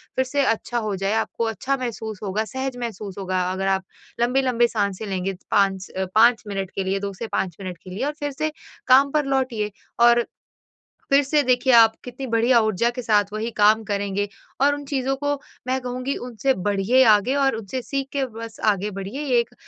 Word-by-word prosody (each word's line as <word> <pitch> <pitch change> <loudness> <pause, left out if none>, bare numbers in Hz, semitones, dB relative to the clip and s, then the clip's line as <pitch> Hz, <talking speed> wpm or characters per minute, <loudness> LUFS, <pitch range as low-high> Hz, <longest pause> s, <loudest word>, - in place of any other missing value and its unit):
फिर 260 - +1
से 280 +2 0
अच्छा 240 0 -1
हो 215 -3 -2
जाए 195 +2 -1
आपको 225 +1 -1
अच्छा 255 +5 -1
महसूस 220 -5 -5
होगा, 210 +2 -1
सहज 260 +2 -4
महसूस 215 -5 -6
होगा 185 -1 -1
अगर 190 +1 -2
आप 190 -1 +1 0.4
लंबी-लंबी 250 -1 +3
साँसें 205 -2 -2
लेंगे 190 0 -2 0.2
5 195 -1 +2
अ, 190 - 0
5 230 +1 +5
मिनट 195 -2 -4
के 195 - -1
लिए 190 +1 -1
2 200 0 -4
से 225 +4 -6
5 180 -6 -2
मिनट 185 -2 -6
के 185 - -11
लिए 190 +8 -3
और 295 - -1
फिर 290 -1 -2
से 310 +3 -2 0.4
काम 270 +2 +6
पर 300 -1 +1
लौटिए, 255 -6 -1 0.3
और 235 0 +5 0.8
फिर 280 0 +5
से 295 +2 +2
देखिए 255 0 +3
आप 225 -1 +7
कितनी 250 +2 -7
बढ़िया 235 +1 +4
ऊर्जा 220 +1 +1
के 250 - -3
साथ 210 -3 +3
वही 220 +2 -3
काम 215 +1 +5
करेंगे, 205 -1 -2 0.3
और 285 +1 +5
उन 290 - -7
चीज़ों 270 -1 -1
को 285 +1 -2 0.4
मैं 260 +1 +1
कहूँगी 250 +2 -3
उनसे 250 +3 0
बढ़िए 205 +5 +2
आगे 210 +6 +3
और 275 -2 +2
उनसे 225 +3 -5
सीख 275 +2 -3
के 275 -2 0
बस 230 0 -8
आगे 200 +2 -4
बढ़िए 195 +8 -5
ये 260 -5 +2
एक 235 - -3
230 Hz, 200 wpm, -23 LUFS, 200-260 Hz, 0.8 s, आप